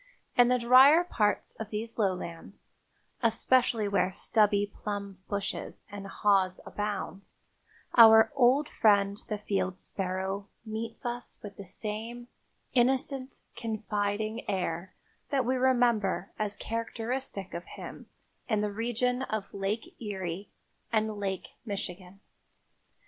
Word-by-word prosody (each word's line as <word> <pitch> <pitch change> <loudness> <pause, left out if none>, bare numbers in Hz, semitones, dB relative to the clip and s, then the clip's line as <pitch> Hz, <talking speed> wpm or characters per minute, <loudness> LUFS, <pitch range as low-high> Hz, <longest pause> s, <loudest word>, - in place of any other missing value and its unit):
In 245 -1 +7
the 250 0 +4
drier 260 +7 +7
parts 210 -12 0
of 220 -2 -6
these 225 +2 -5
lowlands, 185 -3 -3 0.5
especially 230 -1 +3
where 190 -2 +2
stubby 205 +1 +2 0.2
plum 200 -2 -4
bushes 200 -1 -4
and 200 -1 -7
haws 195 -3 +2
abound, 205 -2 -4 0.7
our 220 0 +8
old 275 +2 +4
friend 200 -4 +3
the 210 - -2
field 195 -2 -2
sparrow 190 +1 -3 0.2
meets 225 +2 -5
us 240 0 -4
with 200 -1 -8
the 200 - -9
same 225 +5 -5 0.4
innocent, 260 +1 +1
confiding 215 0 -2
air 180 -1 -2 0.3
that 270 -3 +1
we 255 +2 +1
remember 240 -7 +2
as 210 -1 -1
characteristic 230 -2 -4
of 170 +1 -5
him - - -8 0.4
in 215 -2 +2
the 210 -1 -1
region 240 +3 0
of 215 -6 -3
Lake 200 +3 -3
Erie 195 -3 -4 0.4
and 220 -1 +1
Lake 195 -2 -3
Michigan. 195 -2 -6
210 Hz, 115 wpm, -29 LUFS, 200-240 Hz, 0.7 s, our